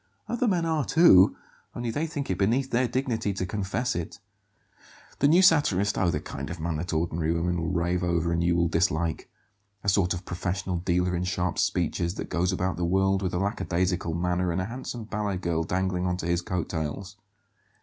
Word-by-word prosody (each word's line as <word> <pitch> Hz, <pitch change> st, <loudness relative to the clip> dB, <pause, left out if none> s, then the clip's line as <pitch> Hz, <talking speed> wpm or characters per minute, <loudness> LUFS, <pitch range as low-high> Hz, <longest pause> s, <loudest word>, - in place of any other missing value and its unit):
"Other 240 Hz, +1 st, 0 dB
men 175 Hz, -5 st, +1 dB
are, 160 Hz, -3 st, +1 dB
too, 120 Hz, -, +6 dB, 0.4 s
only 120 Hz, -1 st, -2 dB
they 155 Hz, +7 st, -1 dB
think 145 Hz, -7 st, -4 dB
it 90 Hz, -, -1 dB
beneath 125 Hz, +7 st, +1 dB
their 125 Hz, +1 st, +2 dB
dignity 115 Hz, -5 st, -1 dB
to 95 Hz, -1 st, -3 dB
confess 105 Hz, +6 st, -2 dB
it. 85 Hz, -1 st, -4 dB, 1.0 s
The 140 Hz, -, +4 dB
new 170 Hz, +5 st, +5 dB
satirist? 105 Hz, -, +4 dB
Oh, 95 Hz, -, +2 dB
the 75 Hz, -, 0 dB
kind 70 Hz, -2 st, -7 dB
of 85 Hz, -, -6 dB
man 80 Hz, 0 st, -2 dB
that 85 Hz, +4 st, -4 dB
ordinary 80 Hz, 0 st, 0 dB
women 85 Hz, +1 st, 0 dB
will 80 Hz, -, -2 dB
rave 90 Hz, 0 st, 0 dB
over 85 Hz, -1 st, 0 dB
and 85 Hz, 0 st, 0 dB
you 85 Hz, 0 st, +2 dB
will 85 Hz, 0 st, +2 dB
dislike. 80 Hz, -1 st, 0 dB, 0.5 s
A 100 Hz, -, +2 dB
sort 95 Hz, -2 st, +2 dB
of 90 Hz, +2 st, -8 dB
professional 90 Hz, +1 st, -3 dB
dealer 90 Hz, +1 st, 0 dB
in 85 Hz, -, -1 dB
sharp 90 Hz, -1 st, -1 dB
speeches, 85 Hz, +2 st, 0 dB
that -, -, -6 dB
goes 90 Hz, +2 st, +1 dB
about 95 Hz, 0 st, -1 dB
the 90 Hz, -, -2 dB
world 95 Hz, +2 st, +2 dB
with 90 Hz, -2 st, -2 dB
a -, -, +1 dB
lackadaisical 90 Hz, -3 st, -1 dB
manner 90 Hz, +1 st, 0 dB
and 85 Hz, -, -1 dB
a 95 Hz, -, -1 dB
handsome 120 Hz, 0 st, -6 dB
ballet 105 Hz, -3 st, -2 dB
girl 85 Hz, -2 st, -1 dB
dangling 90 Hz, +1 st, -1 dB
on 90 Hz, 0 st, 0 dB
to 90 Hz, -, -5 dB
his 85 Hz, 0 st, +1 dB
coat 90 Hz, -1 st, -3 dB
tails." 90 Hz, +4 st, -4 dB
90 Hz, 200 wpm, -27 LUFS, 85-105 Hz, 1.0 s, too